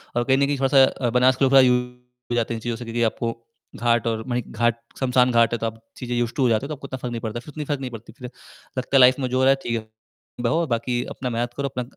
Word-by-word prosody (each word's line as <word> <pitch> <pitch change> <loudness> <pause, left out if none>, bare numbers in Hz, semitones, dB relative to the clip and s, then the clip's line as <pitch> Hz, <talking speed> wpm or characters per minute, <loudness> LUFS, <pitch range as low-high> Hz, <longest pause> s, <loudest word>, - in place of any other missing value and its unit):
और 120 - +2
कहीं 130 +2 +2
न 140 - +3
कहीं 145 0 -1
थोड़ा-सा 135 -2 +3
बना 125 +2 +4
के 130 +1 -2
यूज़ 130 - +1
टू 135 - +8 0.7
हो - - +1
जाते 115 -1 0
हैं - - -3
इन - - -9
चीज़ों 120 -1 -2
से 120 - -7
क्योंकि 115 +1 -1
आपको 115 +1 -1 0.4
घाट 120 -1 +1
और 110 -1 -1
मई 125 -1 -1
घाट 120 0 0 0.2
श्मशान 125 -1 +3
घाट 115 -1 +3
है, - - +1
तो 115 - -2
आप 115 0 -4 0.2
चीज़ें 125 -1 -4
यूज़्ड 120 -1 -1
टू - - -1
तो - - +4
हो - - +2
जाते 115 +3 +1
हो - - -5
तो 155 - -4
आपको 140 0 -10
इतना 130 - -5
फ़र्क 125 -1 -5
नहीं 115 -1 -4
पड़ता 110 0 -4
है - - -5
फ़िर 150 - -12
उतनी 150 -1 -5
फ़र्क 145 -1 -2
नहीं 130 -2 -5
पड़ती 115 -1 -10
फ़िर 125 -1 -9 0.5
लगता 130 +2 -2
है - - +7
लाइफ़ 130 0 +7
में 130 - 0
जो 130 - -1
हो 130 - +2
रहा 135 - +5
है 135 - +6
ठीक 115 - -2
है। 110 - -21 0.5
बहो 145 +8 +1
बाकी 120 0 -1
अपना 125 - -5
मेहनत 120 0 -2
करो 140 0 -1
अपना 125 -1 -4
125 Hz, 310 wpm, -23 LUFS, 115-130 Hz, 0.7 s, टू